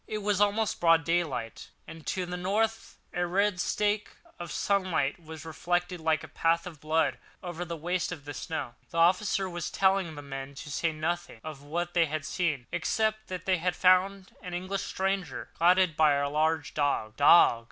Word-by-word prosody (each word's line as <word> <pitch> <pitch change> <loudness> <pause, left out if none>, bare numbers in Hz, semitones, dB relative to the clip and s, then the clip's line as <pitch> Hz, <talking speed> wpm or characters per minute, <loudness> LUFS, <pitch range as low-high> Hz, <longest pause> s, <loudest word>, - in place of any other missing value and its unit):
It 215 -1 -4
was 205 -1 +1
almost 210 +1 +1
broad 165 -1 +5
daylight, 160 -9 -2 0.2
and 160 -1 -11
to 185 -1 -1
the 180 0 -5
north 215 +5 -1 0.2
a 175 - 0
red 195 +1 +1
streak 210 0 0 0.3
of 175 -1 -6
sunlight 185 -6 0
was 160 -1 -9
reflected, 175 +2 -2
like 160 -1 +1
a - - -8
path 165 +2 +1
of 165 -5 -9
blood, 160 +1 +1 0.2
over 175 -1 -4
the 170 -1 -5
waste 175 +3 -1
of 160 -5 -7
snow. 150 -7 -4 0.2
The - - -6
officer 190 +3 +3
was 175 -2 -4
telling 190 -4 +1
the 145 - -8
men 135 0 -7
to 145 +2 -8
say 165 +4 0
nothing 160 -4 -3
of 155 -3 -7
what 175 +4 -3
they 170 -2 +3
had 155 -1 -3
seen, 155 -7 -1
except 215 0 0
that 185 -1 -6
they 185 -2 +2
found 185 +1 +2
an 180 -2 -6
English 185 +2 -3
stranger, 195 -1 -2
guarded 180 -1 +4
by 155 -2 +5
a 140 0 +1
large 155 +2 0
dog. 140 -7 0
"Dog! 145 -4 +6
175 Hz, 180 wpm, -29 LUFS, 155-185 Hz, 0.3 s, Dog